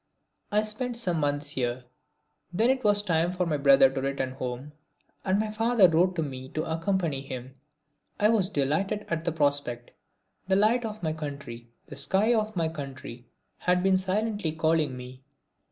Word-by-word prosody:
I 210 +1 +3
spent 235 +3 -3
some 180 -8 0
months 145 0 0
here. 125 -2 -2 0.7
Then 225 +8 +3
it 265 -1 -2
was 205 -1 +3
time 170 -2 +1
for 180 0 -1
my 155 -3 0
brother 140 -1 +6
to 135 0 -3
return 135 -1 -2
home, 130 +2 -5 0.5
and 190 0 +1
my 215 0 -1
father 225 -2 +4
wrote 175 +2 +2
to 165 - 0
me 130 -2 -7
to 155 - 0
accompany 165 -3 -1
him. 130 -1 -8 0.7
I 210 - +4
was 205 -5 +3
delighted 195 +6 -1
at 165 -1 -2
the 170 - +1
prospect. 145 -6 -1 0.6
The 190 - +3
light 225 +4 +3
of 215 -3 -6
my 155 -1 0
country, 140 -6 -7 0.2
the - - -10
sky 190 +11 +2
of 215 -2 0
my 165 -2 +1
country, 135 -6 -8 0.3
had 180 0 +1
been 190 0 +4
silently 190 -2 -1
calling 160 -4 +1
me. 125 +1 -10
165 Hz, 170 wpm, -27 LUFS, 140-205 Hz, 0.7 s, brother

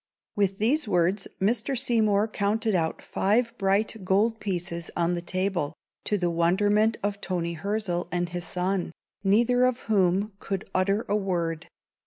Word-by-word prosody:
With 195 -2 +1
these 250 +6 +2
words 185 +1 +1
Mr. 230 +6 +1
Seymour 220 -4 +3
counted 215 +1 0
out 165 -3 -1
five 230 +4 +1
bright 200 +2 +1
gold 210 +5 +2
pieces 175 -3 -3
on 170 0 +1
the 175 - -2
table, 185 -4 -1 0.3
to 210 - +1
the 175 -2 0
wonderment 205 +6 +2
of 205 0 -2
Toni 170 -2 -2
Hirzel 195 0 -2
and 175 0 -1
his 175 0 -4
son, 180 0 -1 0.3
neither 235 +5 +3
of 255 -1 +1
whom 200 0 +1
could 195 -1 -4
utter 195 +4 +1
a 205 - +1
word. 170 -5 -2
195 Hz, 150 wpm, -26 LUFS, 175-215 Hz, 0.3 s, Seymour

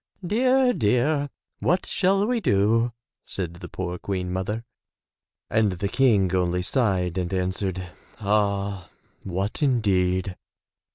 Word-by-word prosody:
"Dear, 255 +5 +3
dear! 140 - +1 0.3
what 180 +3 +1
shall 195 +2 +2
we 245 +1 +1
do*', 115 - +2 0.3
said 90 -3 -4
the 90 0 -9
poor 90 -1 -4
Queen 90 -2 -3
mother 105 +5 -2 0.8
and 110 -3 +2
the 100 +2 -2
King 105 -8 +3
only 90 0 +1
sighed 95 -7 0
and 90 -1 -2
answered 95 0 -2 0.3
"Ah, 100 -3 0 0.3
what 95 - -3
indeed!'' 95 -8 +1
100 Hz, 115 wpm, -25 LUFS, 90-125 Hz, 0.8 s, Dear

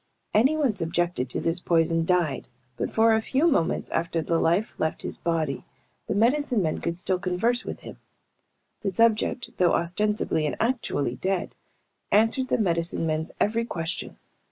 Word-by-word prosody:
Anyone 265 +1 +3
subjected 170 -6 -1
to - - -2
this 165 +1 +2
poison 165 -1 +2
died, 175 -5 0 0.3
but - - -2
for 225 0 +4
a 220 - +2
few 275 +8 +1
minutes 220 - 0
after 170 0 -1
the 165 +2 +1
life 175 +6 +1
left 160 - -2
his - - -6
body 160 -4 -1 0.4
the - - -1
medicine 240 0 +2
men 155 - -1
could 170 0 -2
still 185 0 +1
converse 200 +7 0
with - - -6
him. - - -10 0.8
The 200 - -1
subject, 230 +4 +1
though 180 -2 +3
ostensibly 175 -2 0
and - - -2
actually 225 - -1
dead, 190 -1 -2 0.6
answered 225 +5 +3
the - - +1
medicine 170 -5 0
men's 160 0 -2
every 225 +3 +1
question. 170 -6 -4
180 Hz, 155 wpm, -26 LUFS, 165-225 Hz, 0.8 s, for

